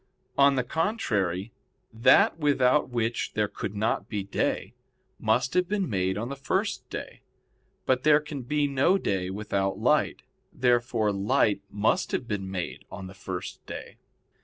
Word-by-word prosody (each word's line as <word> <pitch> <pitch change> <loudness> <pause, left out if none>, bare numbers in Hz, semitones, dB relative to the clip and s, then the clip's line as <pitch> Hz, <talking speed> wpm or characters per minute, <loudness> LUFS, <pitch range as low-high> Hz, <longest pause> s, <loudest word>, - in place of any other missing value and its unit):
On 140 0 +5
the 125 - +1
contrary, 115 - -1 0.4
That 130 +7 +5
without 145 -2 +3
which 115 -1 -1
there 105 -1 +1
could 100 0 -6
not 105 0 -1
be 105 -3 -2
day, 100 - -1 0.5
must 120 +4 +1
have 180 -1 +2
been 200 -2 0
made 95 -3 0
on 115 +3 -3
the 140 - -4
first 140 0 -2
day. - - -7 0.6
But 130 -1 +2
there 150 +1 +5
can 150 -2 -6
be 145 +4 0
no 140 +7 +3
day 95 - -1
without 95 -1 -1
light. - - +1 0.3
Therefore 120 -3 +2
light 100 +1 +2
must 105 +2 0
have 125 - -1
been 95 -3 -3
made 90 -2 -4
on 95 -1 -7
the 95 - -9
first 95 -1 -6
day. - - -8
115 Hz, 155 wpm, -27 LUFS, 100-140 Hz, 0.6 s, On